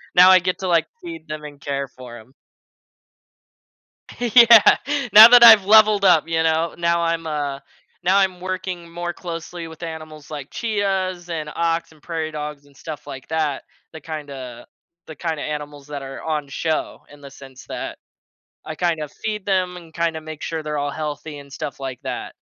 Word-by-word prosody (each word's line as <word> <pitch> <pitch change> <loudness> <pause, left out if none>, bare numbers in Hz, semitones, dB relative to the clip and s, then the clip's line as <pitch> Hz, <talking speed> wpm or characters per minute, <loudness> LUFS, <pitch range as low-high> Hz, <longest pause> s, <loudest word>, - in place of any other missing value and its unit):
now 180 +1 +8
I 185 - +7
get 180 +1 -2
to, 190 - -4
like, 165 -3 +2 0.2
feed 165 -2 -9
them 155 0 -6
and 145 -1 -10
care 140 -1 -3
for 125 -2 -12
'em. 120 +4 -17 1.9
Yeah. 235 -2 +7 0.4
Now 220 +2 +11
that 245 -1 +8
I've 220 -4 +9
leveled 210 -1 +5
up, 170 -5 +4
you 160 0 0
know? 160 +1 0
Now, 170 0 +1
I'm 165 0 -1
a 145 -3 -3 0.4
now 190 +3 +3
I'm 190 -2 +1
working 185 -2 -5
more 175 +1 -4
closely 170 -1 -7
with 160 +1 -12
animals 155 -2 -9
like 145 -2 -7
chias, 190 -5 -2
and 155 -3 -4
ox, 165 0 -1
and 155 -2 -21
prairie 160 -1 -4
dogs, 150 -1 -7
and 140 -1 -23
stuff 150 +1 -9
like 130 -1 -9
that. 155 -3 -1 0.3
The 160 - -10
kinda 135 -6 -8 0.4
the 155 - -10
kinda 160 0 -4
animals 150 -1 -6
that 145 -1 -6
are 135 0 -8
on 155 -2 -2
the 140 - -19
show, 160 +2 -3
in 145 0 -16
the 140 -1 -11
sense 135 -2 -14
that, - - -6 0.7
I 155 - -6
kind 165 -1 -1
of 150 - -7
feed 210 -2 -3
them 185 -2 0
and 165 -2 -13
kinda 165 -1 -1
make 155 -1 -10
sure 160 -1 -4
they're 150 -1 -4
all 145 0 -2
healthy 150 0 -6
and 140 -1 -13
stuff 140 0 -6
like 130 -2 -6
that. - - -6
160 Hz, 185 wpm, -21 LUFS, 145-180 Hz, 1.9 s, Now